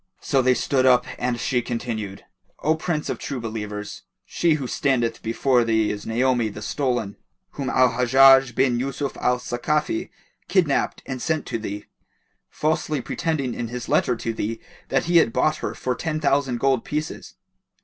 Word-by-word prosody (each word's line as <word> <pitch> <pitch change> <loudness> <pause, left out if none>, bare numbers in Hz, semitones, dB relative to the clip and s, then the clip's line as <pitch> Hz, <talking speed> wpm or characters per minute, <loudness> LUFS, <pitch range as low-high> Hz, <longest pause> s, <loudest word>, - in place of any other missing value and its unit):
So 135 - +1
they 130 0 +3
stood 130 0 +1
up 125 -1 +5
and 125 -1 -1
she 125 +1 0
continued, 115 -5 -5 0.4
"O 155 - +3
Prince 160 -1 -2
of - - -3
True 135 -3 -4
Believers, 105 -2 -5 0.2
she 170 -3 +1
who 140 -4 -4
standeth 125 -3 0
before 120 +2 +2
thee 110 -2 +1
is 105 0 -6
Naomi 120 0 +1
the 105 +1 -8
stolen, 120 -4 -2 0.3
whom 135 -2 -4
Al 130 -1 +4
Hajjaj 130 +1 +5
bin 120 -1 +2
Yusuf 135 +2 -3
al 125 0 +1
Sakafi 150 - -1 0.4
kidnapped 170 -8 +1
and 130 -2 -5
sent 160 0 -1
to 115 - -3
thee, 105 -1 -6 0.6
falsely 155 -1 -1
pretending 140 -1 -2
in 120 - -4
his 120 +1 -6
letter 125 - +2
to 115 0 -3
thee 115 +1 -3 0.3
that 135 - +1
he 170 +1 +4
had 140 -9 +4
bought 155 +6 +1
her - - -4
for 130 - -2
ten 155 +3 -3
thousand 140 -4 +1
gold 135 -3 +2
pieces. 150 +1 -5
125 Hz, 170 wpm, -23 LUFS, 115-140 Hz, 0.6 s, up